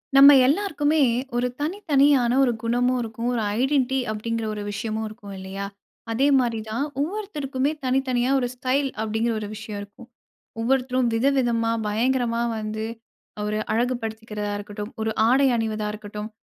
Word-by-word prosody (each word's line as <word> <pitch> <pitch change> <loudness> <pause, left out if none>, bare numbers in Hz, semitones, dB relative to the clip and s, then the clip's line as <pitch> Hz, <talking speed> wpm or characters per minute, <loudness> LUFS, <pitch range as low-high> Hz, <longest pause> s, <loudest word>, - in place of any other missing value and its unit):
நம்ம 280 +1 +10
எல்லோருக்குமே, 310 -1 +1 0.4
ஒரு 245 +1 +1
தனித்தனியான 285 -7 +3
ஒரு 250 - +3
குணமும் 245 +2 +2
இருக்கும். 230 +1 -3
ஒரு 235 - 0 0.2
ஐடென்டிட்டி 265 -1 +2
அப்படிங்குற 225 +1 -3
ஒரு 210 -1 -5
விஷயமும் 220 +2 -3
இருக்கும், 215 -2 -10
இல்லையா? 190 +1 -5 0.5
அதே 260 +5 +2
மாதிரி 235 -3 0
தான் 230 +6 -1 0.2
ஒவ்வொருத்தருக்குமே 295 -7 -2
தனித்தனியா 255 -1 +1
ஒரு 245 - 0
ஸ்டைல் 265 +2 0
அப்படிங்குற 220 +2 0
ஒரு 210 - -5
விஷயம் 215 -1 -6
இருக்கும். 205 +4 -13 0.5
ஒவ்வொருத்தரும் 255 0 +1
விதவிதமா, 235 -2 +2 0.2
பயங்கரமா 235 +2 +1 0.2
வந்து 215 0 -3 0.6
ஒரு 210 0 -1
அழகு 245 +3 +1
படுத்திக்குறதா 220 -2 -4
இருக்கட்டும். 205 +1 -7
ஒரு 220 0 0 0.2
ஆடை 270 +3 +4
அணிவதா 215 -1 -2
இருக்கட்டும். 210 0 -7
235 Hz, 135 wpm, -24 LUFS, 215-265 Hz, 0.6 s, நம்ம